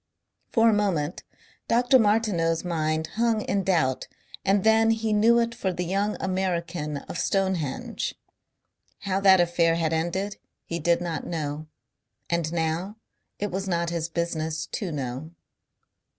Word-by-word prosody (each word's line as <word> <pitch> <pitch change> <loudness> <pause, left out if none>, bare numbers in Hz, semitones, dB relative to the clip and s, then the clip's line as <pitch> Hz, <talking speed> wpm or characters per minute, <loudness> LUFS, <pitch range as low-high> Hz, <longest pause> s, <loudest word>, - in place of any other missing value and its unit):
For 230 -1 +4
a 225 - +5
moment 185 -6 0 0.5
Dr. 245 +2 +4
Martineau's 205 -7 +2
mind 160 -2 -1 0.2
hung 230 -2 +2
in 200 -1 -1
doubt 160 -9 +1 0.4
and 195 0 +2
then 220 0 +5
he 225 -1 +1
knew 225 +3 +5
it 235 0 +1
for 205 -5 -2
the 180 0 -3
young 200 +4 0
American 175 -5 -2
of - - -5
Stonehenge. 190 -8 -1 0.9
How 195 -1 0
that 190 -1 +6
affair 170 -1 +3
had 165 -1 0
ended 180 +5 -1 0.3
he 170 - -3
did 170 +2 +2
not 170 -2 -3
know. 155 -2 -4 0.6
And 170 -2 0
now 170 +5 -2 0.4
it 205 0 -3
was 190 +2 -3
not 170 -2 0
his 170 -1 -2
business 160 -2 -2
to 195 -5 -3
know. 135 +1 -4
175 Hz, 140 wpm, -26 LUFS, 165-205 Hz, 0.9 s, that